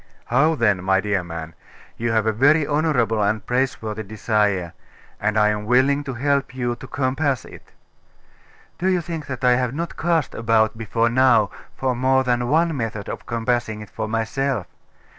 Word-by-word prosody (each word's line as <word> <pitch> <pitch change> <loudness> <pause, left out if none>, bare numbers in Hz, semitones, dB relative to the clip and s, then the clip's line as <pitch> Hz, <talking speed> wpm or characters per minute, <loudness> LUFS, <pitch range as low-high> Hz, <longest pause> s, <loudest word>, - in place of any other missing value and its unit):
'How 150 +7 +3
then, 105 -8 +1
my 95 0 +3
dear 100 -2 -1
man! 85 -1 -7 0.4
You 115 0 -2
have 110 -1 +2
a 110 - +3
very 145 +7 +4
honourable 140 -8 +1
and 105 +2 0
praiseworthy 120 -4 -1
desire; 105 -4 0 0.5
and 110 +1 0
I 105 -1 +4
am 105 0 -2
willing 135 +4 +3
to 135 -3 -4
help 140 0 0
you 120 -2 -1
to 135 - -10
compass 135 -1 -1
it.' - - -14 1.1
'Do 185 - 0
you 185 -2 +2
think 165 -3 -6
that 130 -2 -6
I 125 -1 +5
have 125 0 -1
not 170 +2 -4
cast 165 -3 0
about 110 -1 +2
before 115 +1 0
now 120 -4 +4 0.3
for 130 -2 0
more 130 +2 +2
than 120 -1 0
one 165 +2 +2
method 110 -5 -4
of - - -7
compassing 115 -2 -1
it 105 - -11
for 110 -1 -4
myself? 115 0 -1
120 Hz, 175 wpm, -22 LUFS, 110-135 Hz, 1.1 s, I